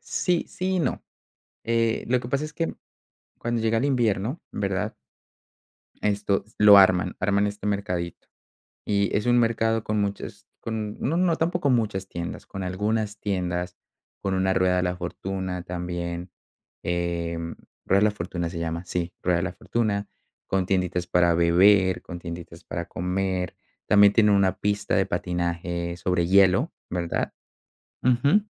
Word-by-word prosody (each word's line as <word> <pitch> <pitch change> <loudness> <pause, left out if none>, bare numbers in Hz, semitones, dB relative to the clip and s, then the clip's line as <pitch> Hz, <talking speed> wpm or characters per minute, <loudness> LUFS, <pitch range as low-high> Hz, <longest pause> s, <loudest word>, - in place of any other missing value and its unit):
sí, 175 -2 0
sí 185 +1 -2
y - - +1
no, - - -1 0.6
eh, 115 -1 +1
lo 125 0 +2
que 120 - -7
pasa 140 +3 0
es 155 - -7
que, 165 +1 -2 0.6
cuando 120 -1 -2
llega 115 0 +2
el 120 - +1
invierno, 120 - 0
¿verdad? 100 -2 -2 1.1
Esto 100 -1 +1
lo 105 -1 +9
arman, 90 -2 +4
arman 100 +2 +2
este 105 0 -5
mercadito. 100 -4 -3 0.6
Y 100 -1 +1
es 105 - 0
un 120 0 +4
mercado 115 -1 +1
con 105 -1 0
muchas 100 0 -4
con 110 -2 -4
no, 160 +6 0
no, 175 -2 +2
tampoco 170 -2 0
muchas 105 -6 0
tiendas, 85 -2 -6
con 95 - -6
algunas 105 +3 -1
tiendas, 90 -2 -2 0.4
con 95 -1 -1
una 95 0 +2
rueda 95 -1 +2
de 90 - +1
la 90 0 -1
fortuna 90 0 -4
también, 90 0 -4 0.5
eh, 85 -1 -1 0.5
rueda 95 - +4
de 105 - +5
la 105 - +3
fortuna 85 -3 -4
se 85 - -6
llama, 85 +1 -3
sí, 90 0 -2
rueda 90 -1 +2
de 85 - -1
la 95 - -3
fortuna, 105 -2 -1 0.4
con 95 -1 +1
tienditas 90 -2 0
para 85 -1 +3
beber, 95 +3 +4
con 90 -1 -7
tienditas 85 0 -8
para - - -4
comer. 90 0 -2 0.3
También 100 -1 +6
tiene 105 -2 +5
una 95 -2 +3
pista 105 0 0
de - - +3
patinaje 85 0 -2
sobre 85 -1 0
hielo, 100 - +4 0.2
¿verdad? 85 -1 -2 0.7
Ujú. 140 - +4
95 Hz, 155 wpm, -25 LUFS, 90-110 Hz, 1.1 s, lo